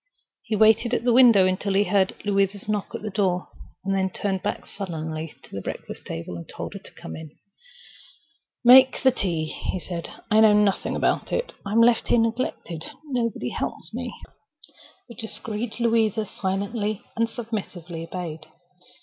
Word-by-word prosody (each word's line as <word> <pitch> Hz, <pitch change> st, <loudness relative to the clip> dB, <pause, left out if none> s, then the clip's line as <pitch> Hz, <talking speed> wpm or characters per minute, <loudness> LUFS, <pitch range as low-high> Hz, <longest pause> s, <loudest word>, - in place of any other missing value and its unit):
He 220 Hz, -, -2 dB
waited 220 Hz, +3 st, +4 dB
at -, -, -1 dB
the 245 Hz, -1 st, +3 dB
window 235 Hz, -6 st, +7 dB
until 185 Hz, +1 st, 0 dB
he 200 Hz, -, +5 dB
heard 200 Hz, -2 st, +2 dB
Louisa's 200 Hz, 0 st, +1 dB
knock 210 Hz, -2 st, -2 dB
at -, -, -6 dB
the 215 Hz, -, -3 dB
door, 185 Hz, -3 st, 0 dB, 0.4 s
then 195 Hz, -1 st, +1 dB
turned 190 Hz, 0 st, -2 dB
back 205 Hz, -, -3 dB
sullenly 160 Hz, -4 st, -5 dB
to -, -, -16 dB
the 100 Hz, -, -3 dB
breakfast -, -, -7 dB
table 85 Hz, +1 st, -5 dB
and 85 Hz, -, -10 dB
told -, -, -6 dB
her -, -, -7 dB
to -, -, -14 dB
come 80 Hz, -, -8 dB
in. 160 Hz, -1 st, -8 dB, 1.4 s
"Make 260 Hz, +2 st, +8 dB
the 260 Hz, -, +6 dB
tea," 170 Hz, -9 st, -1 dB
he 170 Hz, +3 st, -4 dB
said. 170 Hz, -1 st, -5 dB, 0.2 s
"I 215 Hz, -, +6 dB
know 220 Hz, -1 st, +7 dB
nothing 205 Hz, -2 st, +2 dB
about -, -, 0 dB
it. -, -, -1 dB
I'm 210 Hz, +3 st, +2 dB
left 235 Hz, 0 st, +4 dB
here -, -, +4 dB
neglected. 225 Hz, -8 st, -1 dB, 0.2 s
Nobody 245 Hz, -5 st, -1 dB
helps -, -, -4 dB
me." -, -, -4 dB, 1.0 s
The 235 Hz, -, -10 dB
discreet 220 Hz, 0 st, -5 dB
Louisa 225 Hz, -2 st, +2 dB
silently 205 Hz, +2 st, -2 dB
and 230 Hz, 0 st, +1 dB
submissively 190 Hz, -8 st, -5 dB
obeyed. 165 Hz, -2 st, -6 dB
205 Hz, 160 wpm, -25 LUFS, 185-230 Hz, 1.4 s, Make